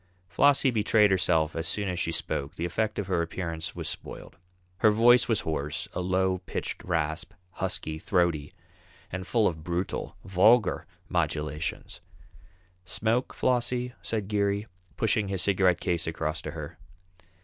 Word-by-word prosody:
Flossie 140 -1 +4
betrayed 105 -2 +4
herself 80 -4 +2
as 80 0 -1
soon 100 +4 -1
as 90 -2 -2
she 85 - 0
spoke, 75 0 -3
the 85 - -2
effect 110 +5 -1
of 105 - -1
her 90 -2 0
appearance 85 -1 -4
was - - -4
spoiled. - - -7 0.4
Her 110 - +5
voice 120 +3 +5
was 115 -3 +1
hoarse, 75 -2 -3
a - - -2
low 95 0 +1
pitched - - -4
rasp, 80 -1 -2 0.2
husky, 80 -2 -3
throaty, 85 -5 +1 0.6
and 95 0 -5
full 115 -3 +2
of 80 -3 -3
brutal, 85 +2 -3
vulgar 95 +3 +4 0.2
modulations. 75 +1 -2 0.8
"Smoke, 110 +6 0
Flossie?" 125 0 0
said 110 -4 -2
Geary, 100 0 0 0.3
pushing 110 -2 +1
his 95 -2 -1
cigarette 95 -3 +3
case 85 -2 -1
across 80 +1 -2
to - - -6
her. 80 0 -8
95 Hz, 145 wpm, -28 LUFS, 80-105 Hz, 0.8 s, Her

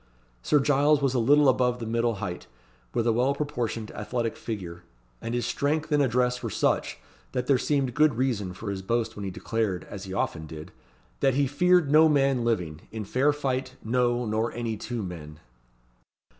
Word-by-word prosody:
Sir 150 - +3
Giles 145 +1 +3
was 135 -2 +1
a 130 - +1
little 145 +5 +5
above 125 -1 +3
the 120 - -6
middle 115 0 0
height, 95 -3 -5 0.4
with 115 - 0
a 115 - +3
well 130 +4 +2
proportioned 120 -7 -3
athletic 115 +2 -3
figure; 90 -6 -6 0.4
and 115 - -3
his 120 - -1
strength 155 +2 -1
and 145 -1 +4
address 125 -1 +1
were - - -3
such, - - 0 0.4
that 125 -1 -1
there 130 -1 +3
seemed 135 -3 0
good 150 -1 +3
reason 110 -7 -1
for 100 +2 -5
his 95 -1 -4
boast 115 +4 -1
when 105 - -6
he - - -2
declared, 100 0 -2
as 100 -1 -8
he 95 - -8
often 80 -4 -2
did, 75 0 -9 0.5
"that 135 -2 +2
he 140 0 +3
feared 175 +2 +3
no 155 +1 +7
man 135 -4 +2
living, 90 -9 -1
in 110 -2 -5
fair 135 +8 +2
fight, 130 -3 -2
no, 120 +1 +1
nor 110 +1 0
any 115 -2 -3
two 115 +1 -4
men." 80 -4 -8
120 Hz, 185 wpm, -27 LUFS, 110-140 Hz, 0.5 s, no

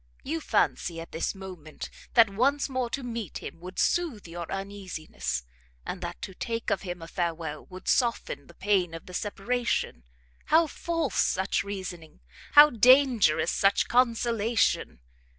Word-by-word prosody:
You 320 +3 -3
fancy, 170 - 0
at 165 - -9
this 165 - -2
moment, 180 -5 -9 0.2
that 230 -2 +8
once 275 +7 +2
more 255 -3 -2
to 275 +2 -4
meet 230 -7 -5
him - - -8
would 180 +2 -10
soothe 305 - 0
your 170 0 -7
uneasiness, 175 - -4 0.4
and 180 - -5
that 175 0 -5
to 190 - -5
take 230 +4 -3
of - - +1
him 175 -2 -6
a - - -8
farewell, 165 -3 -3
would 185 0 -11
soften 230 - 0
the 170 - -16
pain 190 -4 +1
of 165 - -9
the 180 - -11
separation: 215 - -1 0.4
how 325 +2 +5
false 330 +2 -1
such 190 +1 0
reasoning! 185 - -7 0.3
how 295 +1 +10
dangerous 240 - +5
such 195 0 +2
consolation! 230 - +1
195 Hz, 150 wpm, -28 LUFS, 170-240 Hz, 0.4 s, how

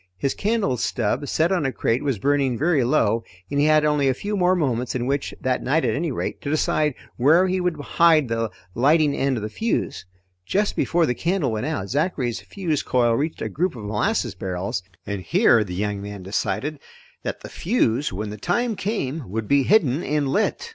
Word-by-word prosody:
His 135 +8 0
candle 205 - 0
stub, 120 +4 -1
set 165 +6 +1
on 180 -5 +1
a 135 - 0
crate, 115 0 0
was 135 -5 0
burning 135 +1 +1
very 155 -1 +2
low 115 -4 +2 0.3
and 145 - 0
he 145 - +4
had 155 0 +4
only 150 -2 +2
a 130 - +1
few 205 +9 -3
more 185 -1 +3
moments 125 -8 -1
in 120 -1 -1
which 140 +1 -1
that 130 -1 0
night 145 +1 +1
at 115 - +1
any 160 +1 -1
rate - - -4
to 140 - -4
decide 150 -1 +1 0.2
where 155 +9 +5
he 185 0 0
would 175 -4 -1
hide 155 -1 +3
the 115 -1 -1 0.2
lighting 145 - +3
end 135 -2 0
of 110 - -4
the - - -2
fuse. 220 - -2 0.4
Just 205 - 0
before 170 0 +2
the 125 - 0
candle 170 0 0
went 110 +5 -2
out, 155 -11 -2
Zachary's 135 -5 -1
fuse 170 -7 -2
coil 120 -2 +2
reached 150 +7 -2
a - - -1
group 175 -2 -1
of 110 - -8
molasses 110 - 0
barrels, 90 0 -3 0.2
and 100 -1 -4
here 160 - +4
the 90 -3 -6
young 100 +1 -2
man 100 -1 -7
decided 140 +9 -2 0.4
that - - -4
the - - -9
fuse, 150 - 0
when 105 +2 -4
the 105 - -7
time 225 - 0
came, 160 - -3
would 110 +2 -3
be 140 0 +4
hidden 155 - +3
and 150 -4 0
lit. 215 - 0
140 Hz, 205 wpm, -23 LUFS, 115-165 Hz, 0.4 s, where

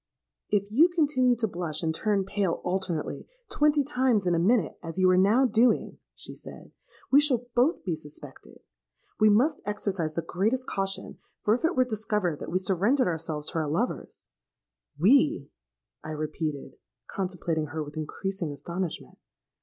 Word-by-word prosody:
'If 200 0 0
you 300 +10 +6
continue 285 -7 +2
to 230 -1 0
blush 170 -4 -3
and 160 -1 0
turn 200 +3 0
pale 195 -3 0
alternately, 180 -4 -3 0.2
twenty 295 -1 +3
times 255 -7 +1
in 175 - +2
a 165 - +2
minute, 185 - +1
as 165 +1 -7
you 185 -1 +4
are - - +4
now 205 +8 +4
doing,' 240 0 +2 0.2
she - - -9
said, - - -12 0.4
'we 280 +2 +7
shall 255 -5 +1
both 255 +7 +2
be 175 -5 -1
suspected. 150 -1 -13 0.6
We 215 - +6
must 260 +9 +3
exercise 195 -6 -2
the 170 - -2
greatest 220 +10 0
caution; 195 -3 -2 0.2
for 210 - +3
if 245 - -1
it 330 +2 +1
were 255 - +3
discovered 210 -8 -1
that - - -6
we 180 - 0
surrendered 195 +9 +2
ourselves 160 -3 -3
to 165 - -2
our 155 -2 -2
lovers——.'—'We!' 235 - -1 0.5
I 155 - -7
repeated, 155 -1 -4 0.3
contemplating 175 -4 -2
her 155 +1 -4
with 145 0 -11
increasing 170 +2 -4
astonishment. 170 +4 -5
195 Hz, 155 wpm, -27 LUFS, 165-245 Hz, 0.6 s, we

